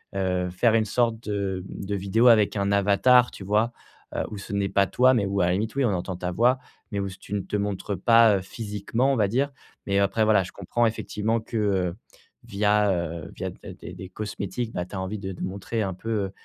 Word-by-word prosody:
heu, 90 -2 0
faire 110 +6 +2
une 110 -1 +3
sorte 115 +1 +1
de 100 -4 -3
de 100 +1 -4
vidéo 100 +5 +2
avec 110 -4 +5
un 100 -1 0
avatar, 105 +5 +4
tu - - -10
vois? 105 +4 +1 0.4
Heu, - - 0
où 105 - -6
ce 100 - -8
n'est 100 -1 +1
pas 100 -1 +3
toi, 130 +5 +4
mais 110 -5 +2
où 100 0 0
à - - +3
la 90 - +2
limite 110 +5 -2
oui, 140 -1 +2
on 105 - +1
entend 90 +1 -3
ta 90 0 -3
voix, 120 +7 +3 0.3
mais 100 - -2
où 100 - -1
c 95 - -10
tu 100 - -9
ne - - 0
te 95 +3 -5
montres 100 -1 -2
pas 115 -2 +5
physiquement, 110 +6 -1
on - - +1
va 105 -4 +2
dire, 135 +7 0 0.3
mais 100 0 +1
après 100 +3 +2
voilà, 105 -3 +4
je 90 - -9
comprends 115 +5 -1
effectivement 110 0 -1
que 100 -6 -1 0.5
via, 105 0 +2
heu, 85 -2 -3
via - - -4
d - - -15 0.2
des - - -9
des 95 - -9
cosmétiques, 105 +3 -4
bah, 90 - -2
tu 90 - -10
as - - -3
envie 95 +3 -4
de 95 -1 -5
de 90 - -9
montrer 100 +4 -3
un 95 -1 -2
peu 100 0 -2
100 Hz, 230 wpm, -25 LUFS, 95-110 Hz, 0.5 s, avec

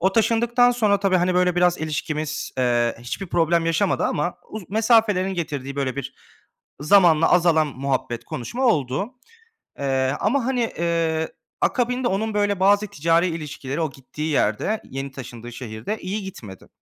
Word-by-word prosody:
o 190 +2 +2
taşındıktan 235 +2 +3
sonra 215 -5 +2
tabii, 195 -2 +3
hani, 180 +1 +1
böyle, 180 -1 +2
biraz 180 0 +3
ilişkimiz, 155 0 -3
eee, 120 -2 +1
hiçbir 120 +11 -5
problem 170 -1 +1
yaşamadı 165 +4 +1
ama 150 +4 -1 0.2
uz 210 -4 -8
mesafelerin 215 -4 +3
getirdiği, 140 -5 -4
böyle, 135 -1 -2
bir 140 - -5 0.7
zamanla 165 -1 +5
azalan 165 -3 +4
muhabbet 130 -3 -3
konuşma 240 - -4
oldu, 155 - 0 0.7
eee, 135 -1 0
ama, 240 +4 +1
hani, 250 -3 0
eee, 165 -1 0 0.3
akabinde 250 0 +1
onun, 215 +3 -1
böyle, 205 -2 +1
bazı 205 +2 +4
ticari 165 +2 +2
ilişkileri 150 -2 -4
o 155 -3 -1
gittiği 150 +4 -6
yerde, 145 - 0
yeni 135 +1 -5
taşındığı 120 -3 -9
şehirde 115 - -5
iyi 200 +2 -4
gitmedi 105 - -10
170 Hz, 145 wpm, -23 LUFS, 140-205 Hz, 0.7 s, zamanla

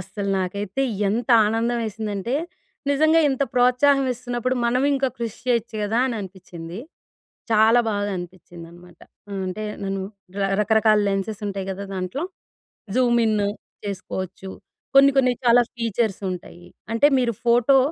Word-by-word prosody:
అస్సలు 195 +2 -4
నాకైతే 200 +6 -2 0.3
ఎంత 230 +3 -1 0.2
ఆనందం 230 +2 0
వేసిందంటే 215 +2 -3 0.6
నిజంగా 315 +3 +4
ఇంత 270 0 0
ప్రోత్సాహం 250 +3 +4
ఇస్తున్నప్పుడు 245 +1 -2
మనం 250 +2 +2
ఇంకా 270 -1 +1
కృషి 230 -2 -4
చేయొచ్చు 235 -2 0
కదా! 220 +3 0
అని 245 - -2
అనిపిచ్చింది. 175 -2 -9 0.7
చాలా 220 +2 +5
బాగా 205 -1 -1
అనిపిచ్చింది 175 -1 -9
అనమాట. 175 0 -16 0.5
అంటే 185 +4 -4 0.2
నన్ను 195 0 -2 0.6
రకరకాల 215 0 +4
లెన్సెస్ 195 +2 -2
ఉంటాయి 195 -1 -4
కదా! 195 +1 -5
దాంట్లో. 185 - -3 0.7
జూమిన్ 235 -4 +3 0.5
చేసుకోవచ్చు. 190 -1 -5 0.5
కొన్ని 275 0 +8
కొన్ని 255 -2 +4
చాలా 240 +1 +6
ఫీచర్స్ 230 -3 -1
ఉంటాయి. 175 -1 -8 0.3
అంటే 230 +5 +4
మీరు 240 -2 +1
ఫోటో 240 +3 +5
220 Hz, 125 wpm, -23 LUFS, 195-245 Hz, 0.7 s, కొన్ని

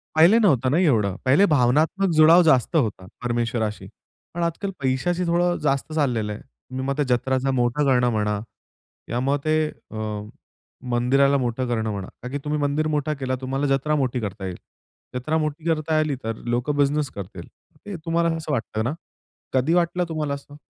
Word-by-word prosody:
पहिले 170 +8 +6
नव्हतं 140 - +3
ना 155 - +2
एवढं, 110 - +2
पहिले 145 +10 +5
भावनात्मक 155 +7 +2
जुळाव 160 +3 +7
जास्त 155 0 +3
होता 110 -10 0 0.2
परमेश्वराशी. 115 -2 -2 0.5
पण 175 - -2
आज 170 - +1
काल 200 -1 -2
पैशाशी 140 +7 0
थोडं 175 +1 +2
जास्त 140 +3 0
चाललेलं 120 -9 0
आहे. - - -9
तुम्ही 130 0 -8
मग 140 +1 -2
ते 150 - +2
जत्राचा 130 +2 0
मोठा 125 +3 +1
करणं 125 -3 +3
म्हणा. 105 -1 0 0.7
त्यामुळे 130 +5 0
ते 155 0 +2 0.2
अ, 110 - -6 0.9
मंदिराला 135 +4 +3
मोठं 125 0 -1
करणं 110 -2 -1
म्हणा, 100 -2 -5
कारण 125 - -7
की 145 - -2
तुम्ही 150 0 -1
मंदिर 145 +2 0
मोठा 150 0 0
केला, 130 -3 -2
तुम्हाला 135 +2 -1
जत्रा 135 +3 +1
मोठी 130 -3 0
करता 100 -1 -5
येईल. 90 -1 -5 0.6
जत्रा 155 +6 -1
मोठी 155 0 -3
करता 155 -1 +1
आली 155 -2 0
तर 115 0 -3 0.2
लोकं 130 +5 -1
बिझनेस 145 0 +1
करतील. 95 -3 -8 0.4
ते 205 -2 -6
तुम्हाला 165 0 +1
असं 155 -1 -5
वाटतं 110 -4 -2
ना? 125 - -1 0.6
कधी 135 +6 +2
वाटलं 175 0 +1
तुम्हाला 150 -3 -2
असं? 140 +1 -9
140 Hz, 175 wpm, -23 LUFS, 120-155 Hz, 0.9 s, जुळाव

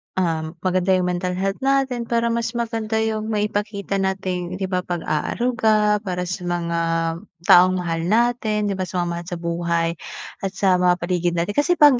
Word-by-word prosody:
uhm, 165 -3 -1
maganda 185 0 +2
yung 180 -1 +1
mental 180 0 -2
health 195 +1 -1
natin 265 -3 +1
para 235 0 +1
mas 235 +1 -2
maganda 225 -2 -2
yung 220 -1 -2
maipakita 205 -2 -1
nating 185 -2 -2
'di 190 - -4
ba 185 - +1
pag-aaruga 210 +6 +1
para 180 -3 -3
sa 180 0 -4
mga 170 -1 -1 0.6
taong 185 +2 +6
mahal 165 -1 -1
natin 220 -2 +1
'di 195 - -2
ba, 185 - -1
sa 180 -1 -1
mga - - -3
mahal 170 0 -5
sa 175 - -4
buhay, 170 0 -1 0.5
at 195 -1 -3
sa 190 -2 +3
mga 180 0 +4
paligid 175 -1 0
natin. 170 +4 0
Kasi 295 +8 +2
'pag 290 -6 +6
190 Hz, 175 wpm, -22 LUFS, 175-220 Hz, 0.6 s, taong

